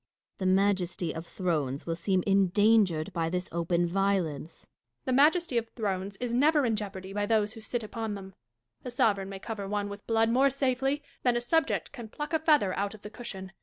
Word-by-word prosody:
Dashkof. - - -50
The 190 - -2
majesty 190 -4 +1
of 160 +1 -7
thrones 150 -7 -2
will 165 - -2
seem 185 +2 0
endangered 195 -3 +3
by 165 -1 0
this 180 +1 -2
open 170 +1 +1
violence. 175 -5 -1
Catharine. - - -26 0.3
The 260 - 0
majesty 300 0 +4
of 230 0 -9
thrones 195 -3 -3
is 245 -1 -3
never 290 +3 +4
in 225 -2 +1
jeopardy 195 -2 -6
by 205 0 -1
those 215 -1 +2
who 225 - -10
sit 235 +1 -3
upon 220 0 -4
them. 190 -1 -9 0.5
A - - -5
sovereign 215 -6 +1
may 195 - -6
cover 200 0 -5
one 205 0 -2
with 200 0 -9
blood 225 0 +3
more 265 +3 +4
safely 270 +1 0 0.2
than 245 -1 +2
a - - +2
subject 320 +7 0
can 240 -6 -9
pluck 295 +7 -6
a 320 - +3
feather 295 - +3
out 200 +1 -2
of 210 - -17
the 210 - -8
cushion. 195 -6 -7
205 Hz, 205 wpm, -29 LUFS, 190-240 Hz, 0.5 s, majesty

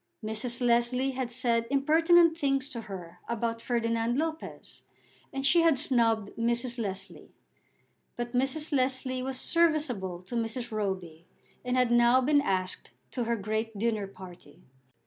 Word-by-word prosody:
Mrs. 235 +3 -1
Leslie 240 +3 +2
had 260 -2 -3
said 235 -2 +1
impertinent 325 +4 +4
things 275 -4 0
to 235 -6 -6
her 180 -3 -8
about 230 0 -2
Ferdinand 230 0 0
Lopez, 320 +1 -4 0.5
and 270 0 -3
she 340 +4 +5
had 330 -4 +4
snubbed 230 -7 +1
Mrs. 235 +1 0
Leslie. 195 -4 -6 0.8
But 240 0 -5
Mrs. 270 +5 0
Leslie 260 -1 0
was 260 0 -3
serviceable 265 - +1
to 185 - -11
Mrs. 235 +1 -3
Roby, 185 -6 -4 0.4
and 250 0 -1
had 250 -1 +3
now 240 +1 +5
been 285 +3 +3
asked 185 -5 -2 0.2
to 245 -3 -2
her 235 +1 0
great 220 +1 -3
dinner 215 -2 -1
party. 180 -4 -13
240 Hz, 140 wpm, -29 LUFS, 220-265 Hz, 0.8 s, she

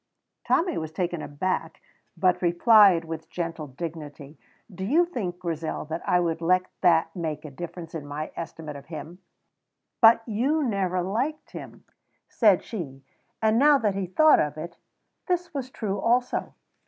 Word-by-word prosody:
Tommy 345 -1 +2
was 160 -1 -5
taken 175 -1 -2
aback, 185 +7 -3 0.4
but 180 -1 +2
replied, 180 0 +5
with 160 -1 -7
gentle 165 -3 -4
dignity, 150 0 -8 0.4
"Do 190 - -6
you 305 - +3
think, 205 - -4
Grizel, 165 -3 -4 0.2
I 180 - +4
would 165 -1 -1
let 185 +2 +3 0.2
that 165 -2 +3
make 160 -4 -4
any 140 -3 -10
difference 170 0 -8
in 150 -3 -6
my 150 +2 -5
estimate 160 -2 -7
of 140 - -11
him?" 160 +2 -8 0.8
"But 225 0 +7
you 265 +8 +1
never 190 -6 0
liked 250 - -2
him," - - -10 0.4
said 210 -6 +3
she; 140 - -7 0.4
and 220 +1 +4
now 290 +1 +6
that 215 -6 0
he 195 -1 -3
thought 310 - +5
of 150 0 -1
it, 170 +2 -7 0.5
this 355 -2 -1
was 265 -3 -4
true 205 -6 -3
also. 245 +4 0
180 Hz, 155 wpm, -26 LUFS, 160-225 Hz, 0.8 s, But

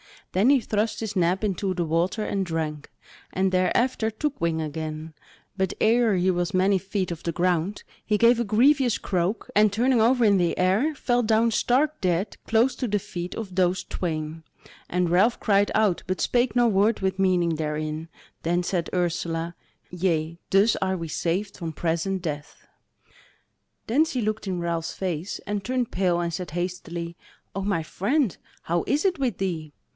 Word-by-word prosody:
Then 200 +7 +3
he 275 -2 +5
thrust 215 +1 -1
his 220 -2 -4
neb 180 +2 +1
into 195 -1 -1
the 175 -2 -1
water 170 +7 0
and 200 -2 -1
drank, 155 -3 -3 0.4
and 190 0 +1
thereafter 220 +5 +1
took 285 +6 -3
wing 165 -1 0
again; 155 +1 -5 0.4
but 190 -1 0
ere 225 -1 +3
he 185 +1 +2
was 175 -1 -1
many 190 +2 +3
feet 195 -1 -3
off 165 - -5
the 170 - -3
ground 180 +3 0 0.2
he 210 - +1
gave 235 +2 +5
a 235 - 0
grievous 250 +3 +3
croak, 185 +3 -2
and 210 0 +5
turning 240 +3 +2
over 245 +2 +4
in 200 -2 +5
the 175 -2 +1
air 205 +12 +2
fell 245 -3 +1
down 225 0 +3
stark 275 +7 +1
dead 180 +2 0
close 235 +3 +3
to 255 - -2
the 210 -1 +1
feet 180 -3 -6
of 205 -5 -6
those 180 0 +2
twain; 160 -2 -4 0.5
and 180 -1 +1
Ralph 195 +8 +3
cried 205 -1 +3
out 210 -5 +2
but 185 0 -2
spake 245 -2 +1
no 245 -1 +4
word 210 0 +2
with 190 0 -1
meaning 175 -4 +2
therein; 155 +1 -3 0.3
then 175 +2 0
said 175 -2 -1
Ursula: 170 -1 -1 0.4
"Yea, 170 -2 -1
thus 200 +4 +4
are 190 0 -1
we 165 -2 -5
saved 180 +6 -2
from 165 -3 -5
present 170 +4 -1
death." 150 -3 -6 1.2
Then 280 +8 +3
she 260 -6 -2
looked 215 -1 -2
in 180 -2 -2
Ralph's 170 -1 -2
face, 180 0 -3
and 205 -1 -3
turned 250 +1 -1
pale 180 -2 +1
and 170 -1 -2
said 180 -1 -5
hastily: 170 -1 -4 0.4
"O 195 - -3
my 190 -5 0
friend 230 - 0 0.3
how 170 +1 0
is 290 +2 +1
it 360 -5 +1
with 250 -8 0
thee?" 165 -6 -3
190 Hz, 175 wpm, -25 LUFS, 170-220 Hz, 1.2 s, he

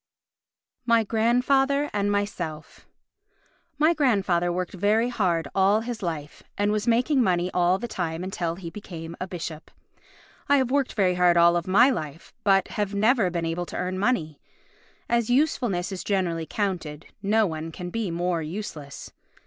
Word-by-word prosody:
My 230 -2 +3
Grandfather 270 +6 +2
and 205 0 0
Myself 180 -7 -4 0.9
My 310 +3 +4
grandfather 195 - +1
worked 180 0 -3
very 210 +5 +2
hard 170 -10 0
all 195 +3 +3
his 230 -1 -5
life, 160 -5 -5 0.2
and 205 +1 +1
was 215 +1 -1
making 250 +4 +3
money 180 -4 +1
all 180 +1 +3
the 240 +4 -5
time 170 -5 -3
until 175 -3 -3
he 170 -2 -8
became 170 -5 -8
a 185 - -2
bishop. 165 -3 -7 0.8
I 285 - +6
have 260 -2 0
worked 280 -1 +1
very 190 -4 +2
hard 180 -1 +3
all 170 0 +5
my 235 +8 +5
life, 155 - -6
but 195 -1 +3
have 205 -2 -2
never 215 -1 +3
been 170 -1 -2
able 170 +2 -3
to - - -6
earn 185 +1 -2
money. 170 - 0 0.7
As 235 -1 +1
usefulness 245 - +1
is 190 - -5
generally 175 -5 -1
counted, 175 -7 -3 0.2
no 215 +2 +3
one 160 -2 -4
can 175 +2 -7
be 225 -2 -2
more 170 0 -1
useless. 155 -4 -7
190 Hz, 155 wpm, -25 LUFS, 170-225 Hz, 0.9 s, I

